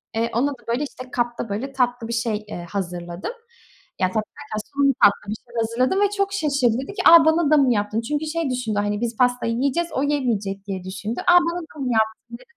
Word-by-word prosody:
eee, 230 +1 0
ona 270 +5 +2
da 270 - -8
böyle 240 +5 0
işte 255 -3 -8
kapta 240 -2 -2
böyle 260 +7 -4
tatlı 245 -3 0
bir 235 - -4
şey, 230 -2 0
eee, 175 -4 -7
hazırladım. 175 - -4 0.7
Ya, 185 - +4
tatlı 215 +4 -1 0.2
derken 220 -7 -5
son 280 0 +3
bir - - +3
tatlı 205 0 +4
bir - - -2
şeyler 235 +1 -7
hazırladım 255 - +1
ve 405 - +4
çok 395 0 0
şaşırdı. 280 - +1
Dedi 340 - -8
ki, - - -3
"a, 335 -1 +9
bana 315 -1 +3
da 305 - +6
mı 260 -4 +4
yaptın?" 210 +2 -1
Çünkü 295 +6 -2
şey 315 -1 -2
düşündü, 225 -5 -1
hani 205 +1 -1
biz 235 -2 -2
pastayı 245 -2 +2
yiyeceğiz, 280 +8 0
o 270 - 0
yemeyecek 215 -9 -1
diye 190 -2 -4
düşündü. 200 +5 -5
"A, 355 - +7
bana 350 0 +4
da 320 -3 -13
mı 255 -2 -1
yaptın?" 220 +2 -1
dedi. - - -19
240 Hz, 230 wpm, -22 LUFS, 215-285 Hz, 0.7 s, a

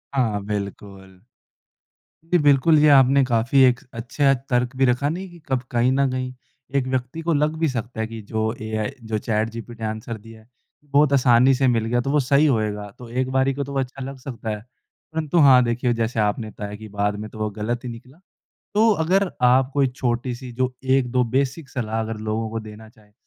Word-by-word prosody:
हाँ 110 -6 +1
बिल्कुल। 100 -2 -6 1.1
जी 180 - +5
बिल्कुल 145 +2 +5
जी 150 - +5
आपने 135 0 +6
काफ़ी 120 +2 +2
एक 125 -1 +4
अच्छा 130 +4 +1 0.2
तर्क 125 0 0
भी 135 +1 +3
रखा 125 +3 +1
नहीं 185 +4 -5
कि 175 - -14
कब 130 -3 0
कहीं 120 +1 +2
न 135 0 +2
कहीं 130 0 -3 0.4
एक 130 -2 +1
व्यक्ति 130 +4 -3
को 165 +1 0
लग 150 +1 +1
भी 160 -1 +1
सकता 120 -2 -5
है 110 - -1
कि 115 0 -8
जो 110 +1 -2
एआई 110 +2 -2 0.2
जो 110 -1 -1
चैटजीपीटी 115 +1 -3
आंसर 110 +1 -4
दिया 115 +1 -14
है, 110 - -25 0.4
बहुत 145 0 +3
आसानी 125 -1 +5
से 135 +1 +2
मिल 115 -3 +2
गया 120 +2 +1
तो 135 - -2
वो 150 - +3
सही 140 +2 +3
होएगा 105 -6 0
तो 120 -2 -10
एक 130 +2 -1
बारी 135 +1 +2
को 140 +1 -3
तो 140 0 -7
अच्छा 135 +1 -4
लग 135 +1 -7
सकता 120 -4 -7
है। 105 -1 -3 0.5
परंतु 160 +1 -1
हाँ 130 -4 +7
देखिए 120 +1 0
जैसे 115 0 -1
आपने 110 +1 0
बताया 105 -1 -7
कि 110 +1 -10
बाद 105 0 -1
में 110 0 -6
तो 110 - -12
वो 110 0 -1
गलत 110 +4 -3
ही 125 - -5
निकला 125 +6 -12 0.5
तो 220 +2 +4
अगर 190 +3 +2
आप 125 +1 +4
कोई 140 -2 +3
छोटी-सी 125 0 -3
जो 130 +1 -1
1-2 130 -1 +2
बेसिक 140 +2 -1
सलाह 115 -3 -3
अगर 110 0 -3
लोगों 110 +1 -3
को 115 +1 -4
देना 110 0 -11
चाहे 105 -2 -24
125 Hz, 205 wpm, -22 LUFS, 110-135 Hz, 1.1 s, हाँ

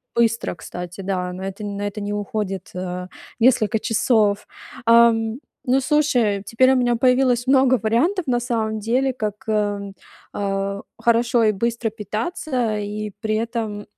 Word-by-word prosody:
быстро, 230 -3 +1
кстати, 180 +3 -8
да, 185 -2 -2
на 185 - -7
это 200 +2 -6
на 200 0 -4
это 205 +1 -6
не 205 0 -3
уходит, 205 -2 -3
а, 180 0 -4 0.3
несколько 225 -2 +3
часов. 215 -2 +1 0.4
Ам, 230 0 +4 0.3
ну, 260 +2 +4
слушай, 250 -9 +2
теперь 255 +3 +4
у - - +2
меня 245 -2 +2
появилось 250 0 +2
много 260 -2 +4
вариантов, 310 - +1
на 245 -2 +2
самом 225 -3 -1
деле, 255 +5 +1
как, 215 -4 -3
эм, 205 -2 -1 0.4
а, 200 0 -2 0.2
хорошо 235 0 +3
и 215 - +4
быстро 230 +2 -1
питаться 225 - -2
и 210 0 -4
при 215 -1 -1
этом 220 -2 -3
220 Hz, 145 wpm, -22 LUFS, 205-240 Hz, 0.4 s, Ам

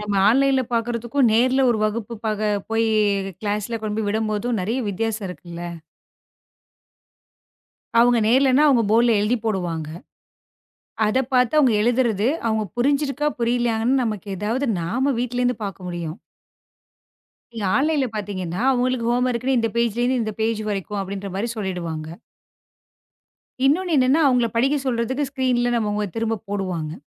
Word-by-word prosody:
நம்ம 210 -1 -3
ஆன்லைன்ல 270 +2 +3
பாக்குறதுக்கும், 235 +2 +1
நேர்ல 255 +4 +3
ஒரு 225 - 0
வகுப்பு 220 +1 -2
பாக்க 215 -1 -1 0.3
போயி 225 0 +1 0.5
கிளாஸ்ல 210 +2 -2
கொண்டு 215 -1 -3
போய் 215 -2 -1
விடும் 215 +1 -1
போதும் 225 +2 -1
நிறைய 225 +8 -1
வித்தியாசம் 220 +1 -2
இருக்குல்ல. 175 -1 -8 2.4
அவங்க 240 0 +4
நேர்லன்னா 265 +3 +4
அவங்க 250 -5 +4
போர்ட்ல 230 0 +4
எழுதிப் 220 +2 0
போடுவாங்க. 175 -7 -2 1.2
அத 215 +5 +1
பாத்து 250 +1 +3
அவங்க 265 -6 +5
எழுதுறது, 235 -2 +2 0.2
அவங்க 220 -1 0
புரிஞ்சிருக்கா, 280 +3 +1
புரியலையான்னு 240 +2 +1
நமக்கு 215 -3 -4
ஏதாவது 225 +8 -1
நாம 255 +12 0
வீட்டுல 245 0 -2
இருந்து 245 -2 +1
பார்க்க 195 -2 -6
முடியும். 170 -2 -5 1.4
நீங்க 225 -3 -5
ஆன்லைன்ல 290 -1 +2
பாத்தீங்கன்னா 185 -4 -4
அவங்களுக்கு 250 -2 0
ஹோம் 245 +1 +2
வோர்க்னு 255 +2 0
இந்த 230 -1 +1
பேஜ்லந்து 240 +2 +1
இந்த 215 -1 -3
பேஜ் 220 0 0
வரைக்கும் 200 0 -3
அப்படின்ற 195 +1 -5
மாதிரி 210 +5 -2
சொல்லிடுவாங்க. 170 -6 -4 1.6
இன்னொன்னு 345 +6 +2
என்னன்னா 260 +4 +4
அவங்கள 250 -2 +3
படிக்கச் 270 +3 +1
சொல்றதுக்கு 260 +3 -1
ஸ்கிரீன்ல 255 -3 +1
நம்ம 210 -2 -1
திரும்பப் 225 -2 -2
போடுவாங்க. 185 -6 -3
230 Hz, 130 wpm, -22 LUFS, 210-255 Hz, 2.4 s, அவங்க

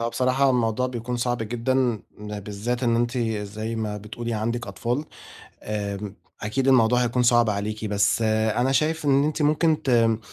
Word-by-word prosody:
هو 115 - -1
بصراحة 130 +3 +1
هو 135 - +5
الموضوع 125 0 +1
بيكون 125 0 -4
صعب 120 0 -1
جدًا، 115 +3 -2
م 105 -4 -2
بالذات 105 +5 -4
إن 115 -2 +2
أنتِ 120 +2 0 0.2
زي 110 +2 -5
ما 105 -2 -3
بتقولي 115 +3 -6
عندِك 115 +3 -2
أطفال، 120 +8 -2 0.6
آمم 100 -1 -4 0.3
أكيد 130 +6 -1
الموضوع 125 -1 +4
هيكون 125 +1 +1
صعب 120 -2 +4
عليكِ، 105 +2 -3
بس 105 +2 +1
أنا 110 +4 +1
شايف 155 +3 +1
إن 140 0 +4
أنتِ 150 0 -1
ممكن 155 +1 +2
ت - - -6
آآ 115 -2 +3
120 Hz, 175 wpm, -24 LUFS, 110-130 Hz, 0.6 s, هو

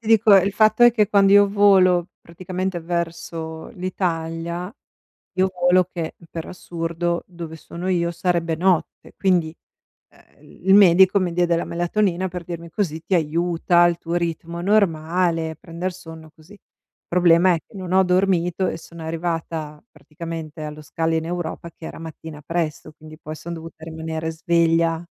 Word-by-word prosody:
Ti - - -13
dico: 225 -2 +6
il 195 +1 +4
fatto 215 +2 +3
è 240 - +9
che 215 -3 +1
quando 200 -2 +4
io 205 0 +7
volo, 190 -3 +4
praticamente 185 +1 -4
verso 165 -1 -4
l'Italia, 170 0 -3 0.6
io 190 0 +2
volo 180 0 +4
che, 165 -3 -4 0.2
per 165 -1 -5
assurdo, 170 -1 -3
dove 170 -3 -8
sono 175 +3 -6
io 170 -2 +1
sarebbe 170 -1 -1
notte. 180 0 0
Quindi, 175 -5 +1 0.6
uhm, - - -25
il 190 +2 0
medico 190 0 +6
mi 180 -2 -1
diede 175 0 +2
la 170 - -1
melatonina 175 +1 0
per 180 -1 -6
dirmi 170 -1 -8
così 165 -4 -2
ti 190 - 0
aiuta, 170 +1 +2
il 170 -1 0
tuo 170 0 -5
ritmo 170 0 -3
normale, 170 -4 +1
prender 170 +3 -5
sonno, 160 -3 -12
così. 175 +6 -17 0.5
Problema 175 +1 +4
è - - -1
che - - -16
non 185 -2 -6
ho 190 0 +5
dormito 180 -1 +1
e - - -2
sono 165 0 -12
arrivata, 160 -2 -4
praticamente, 160 -1 -8
allo 150 0 -7
scalo 165 +2 -2
in 160 0 0
Europa 170 0 -5
che 160 - -11
era - - -9
mattina 160 -1 -9
presto, 160 -1 -3
quindi 155 0 -13
poi 155 0 -8
son 165 +3 -8
dovuta 165 -1 -9
rimanere 160 0 -5
sveglia. 165 0 +2
170 Hz, 155 wpm, -22 LUFS, 165-185 Hz, 0.6 s, è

